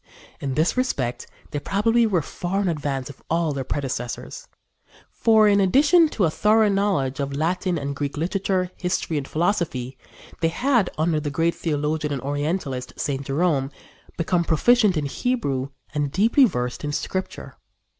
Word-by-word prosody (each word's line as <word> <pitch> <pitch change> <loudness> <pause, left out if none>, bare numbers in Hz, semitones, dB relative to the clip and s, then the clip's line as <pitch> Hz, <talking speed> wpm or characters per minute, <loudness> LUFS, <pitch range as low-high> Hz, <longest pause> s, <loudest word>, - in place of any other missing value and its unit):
In 135 -2 -3
this 160 +3 +2
respect 130 - -1 0.2
they 145 - -2
probably 225 +7 +2
were 180 -7 +1
far 180 +6 -3
in 195 - 0
advance 145 -5 -2
of 140 - -19
all 165 -1 +1
their 135 -1 -3
predecessors. 135 - -4 0.6
For, 220 -2 +4
in 200 -1 +4
addition 295 - +5
to 215 - -1
a 160 - +1
thorough 215 +4 +3
knowledge 195 -10 0
of 140 0 -2
Latin 180 +3 0
and 140 -1 -3
Greek 145 0 -3
literature, 185 +2 -1
history 180 -3 -1
and 135 - -7
philosophy, 155 -8 -1 0.4
they 165 - +2
had, 235 +3 +1
under 155 0 +1
the 150 -1 -3
great 165 +4 +1
theologian 150 -1 -2
and 140 -3 -2
orientalist, 145 -2 -2
St. 140 -1 -2
Jerome, 140 -1 0 0.5
become 170 +1 +1
proficient 205 +4 +3
in 150 - -1
Hebrew 140 - -1 0.2
and 145 -2 -1
deeply 225 - +4
versed 125 - -3
in 145 - -2
Scripture. 185 +5 -4
165 Hz, 155 wpm, -23 LUFS, 140-200 Hz, 0.6 s, addition